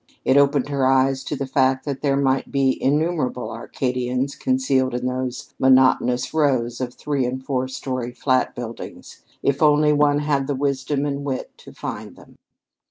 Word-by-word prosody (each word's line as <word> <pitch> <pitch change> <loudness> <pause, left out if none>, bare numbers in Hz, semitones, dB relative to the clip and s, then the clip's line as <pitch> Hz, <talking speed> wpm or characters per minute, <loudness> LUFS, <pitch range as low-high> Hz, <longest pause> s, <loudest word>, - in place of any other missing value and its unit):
It 130 - +3
opened 140 -1 +3
her 140 -2 +1
eyes 135 0 +2
to - - -3
the 140 - -3
fact 130 0 +1
that 140 -2 -4
there 140 -2 +1
might 135 -1 0
be 135 -1 +1
innumerable 150 -3 0
Arcadians 125 +3 -2
concealed 135 - +1
in 125 0 -3
those 125 0 -4
monotonous 130 -1 +3
rows 130 -6 +1
of 125 -1 -4
three 145 -3 -1
and 130 +1 -5
four 130 -2 -1
story 130 -2 -4
flat 130 +1 0
buildings, 120 -1 -8 0.2
if 140 0 +1
only 150 0 +5
one 145 0 +3
had 145 -2 0
the 145 - -1
wisdom 140 +1 -1
and 140 -1 -3
wit 135 -2 -4
to - - -13
find - - -7
them. - - -18
135 Hz, 165 wpm, -22 LUFS, 130-145 Hz, 0.2 s, only